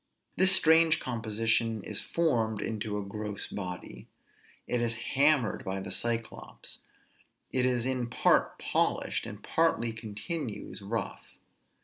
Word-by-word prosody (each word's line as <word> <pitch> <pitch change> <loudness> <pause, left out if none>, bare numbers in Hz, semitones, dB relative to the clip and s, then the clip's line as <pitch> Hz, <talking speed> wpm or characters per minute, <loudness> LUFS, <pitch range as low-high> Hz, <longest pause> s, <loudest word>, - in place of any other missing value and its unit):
_" - - -40
This 190 +1 +6
strange 160 -1 +6
composition 115 -2 0
is - - -1
formed 115 -11 0
into 105 -1 -3
a 100 - -4
gross 105 0 -5
body; 90 -3 -7 0.6
it 120 - -1
is 115 -1 +3 0.2
hammered 140 -4 +3
by 95 0 -3
the 95 0 -6
Cyclops, 115 +2 -3 0.7
it 130 -1 +2
is 125 -2 +1
in 130 -2 -1
part - - +2
polished, - - 0
and - - -9
partly 115 0 +1
continues 110 +2 -5
rough. 100 +1 -5
115 Hz, 125 wpm, -29 LUFS, 105-130 Hz, 0.7 s, This